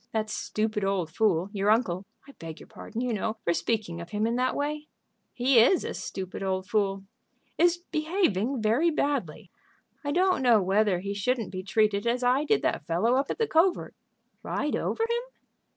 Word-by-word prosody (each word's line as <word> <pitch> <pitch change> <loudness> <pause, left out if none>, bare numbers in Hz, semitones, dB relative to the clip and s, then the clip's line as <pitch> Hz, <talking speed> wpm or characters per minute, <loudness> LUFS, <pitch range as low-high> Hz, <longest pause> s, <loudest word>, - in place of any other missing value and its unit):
That 215 -1 -1
stupid 215 -1 -2
old 190 -5 -1
fool, 185 -1 +1
your 200 0 0
uncle 200 -4 +1 0.2
I - - -11
beg 165 - -9
your - - -12
pardon, 235 - -7
you 250 -2 -1
know, 215 +1 -2
for 170 - +2
speaking 200 -4 -2
of 170 - -9
him 210 +2 -1
in 230 +1 0
that 255 +1 0
way 300 +1 -3 0.2
" - - -49 0.2
"He 250 0 +3
is 255 +11 +5
a - - -4
stupid 190 -1 -6
old 190 -1 -2
fool." 195 -2 0 0.6
"Is 345 +1 +4
behaving 310 - -1
very 240 +11 +3
badly. 280 - -2 0.5
I 285 - -2
don't 365 0 +2
know 240 -4 +5
whether 195 -1 +2
he 200 +1 -3
shouldn't 225 +2 -1
be 185 -1 -4
treated 210 +1 +1
as 245 +2 0
I 255 +4 +3
did 435 - +2
that - - -1
fellow 180 +9 +2
up 270 +2 +1
at - - -2
the 455 - +1
covert." 350 -1 +2 0.5
"Ride 295 - -2
over 450 - -1
him?" 470 +1 0
220 Hz, 190 wpm, -27 LUFS, 195-285 Hz, 0.6 s, is